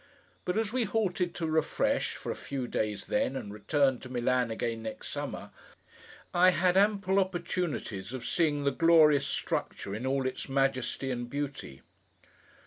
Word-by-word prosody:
But 180 +3 0
as 220 0 0
we 255 -2 +1
halted 190 -4 0
to 165 - -2
refresh, 160 -1 +1
for - - -5
a - - -3
few 135 -3 -4
days 105 -3 -2
then, 260 - 0
and 100 -6 -5
returned 130 +5 +1
to 130 - -9
Milan 125 -1 +1
again 115 0 -2
next 110 0 -6
summer, - - -5 0.8
I 180 +1 +6
had 180 0 +2
ample 200 -1 +3
opportunities 175 - -2
of 130 -2 -6
seeing 150 -4 +1
the 140 - +2
glorious 155 -1 +5
structure 100 - -3
in 115 +5 -3
all 135 0 0
its 130 +1 -3
majesty 135 -1 0
and 120 -1 -4
beauty. 140 - -5
140 Hz, 155 wpm, -30 LUFS, 125-180 Hz, 0.8 s, I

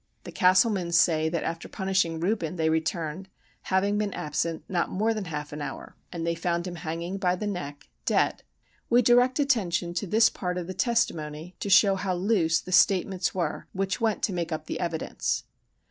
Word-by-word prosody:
The - - -8
Castlemans 185 -2 +3
say 160 -2 +3
that, 170 0 -2
after 165 0 -4
punishing 190 -4 0
Reuben, 180 -2 -1
they 160 -2 +1
returned, 160 +3 -2 0.4
having 200 +2 +1
been 205 -2 -2
absent 160 +2 -2
not 175 -3 0
more 220 +4 +1
than 215 -3 -4
half 150 -3 -5
an 150 - -6
hour, - - -7 0.2
and 170 -2 -4
they 170 - +1
found 170 +1 -1
him 175 -1 -6
hanging 170 +3 -4
by 180 -2 +2
the 210 - -5
neck, 145 -8 -5 0.2
dead. - - +2 0.5
We 245 +1 +5
direct 245 +2 +4
attention 190 - +1
to 180 +3 -2
this 220 +4 +5
part 180 -1 -3
of 180 - -3
the 185 - -6
testimony, 175 - -1
to 200 - -3
show 195 +1 +6
how 190 -1 -1
loose 175 -4 +2
the 185 - -9
statements 190 -1 +3
were 170 -5 -2
which 195 +4 -2
went 220 -2 0
to 195 - +1
make 170 -2 -3
up 155 -1 -3
the - - -4
evidence. 170 -3 -2
180 Hz, 190 wpm, -27 LUFS, 165-200 Hz, 0.5 s, show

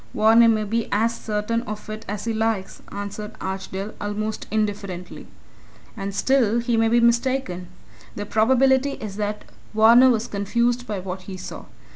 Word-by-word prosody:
"Varner 225 +2 +6
may 215 -1 +2
be 225 +2 -1
as 225 +3 +1
certain 215 +2 -2
of 210 0 -6
it 215 +1 -7
as 205 +1 -4
he 230 - -1
likes," 220 -3 -1
answered 205 +1 -6
Archdale, 190 +1 -5
almost 215 +1 -3
indifferently, 200 -4 -3 0.7
"and 195 0 -5
still 235 +1 +2
he 235 0 0
may 225 0 +3
be 235 +1 +4
mistaken. 235 -6 +1 0.5
The 205 - -4
probability 265 +5 +3
is 205 -2 -7
that 210 0 -3 0.3
Varner 235 +4 +7
was 230 -2 +1
confused 235 +4 0
by 210 - -3
what 185 0 -5
he 190 - -6
saw. 185 - -8
215 Hz, 155 wpm, -23 LUFS, 200-235 Hz, 0.7 s, Varner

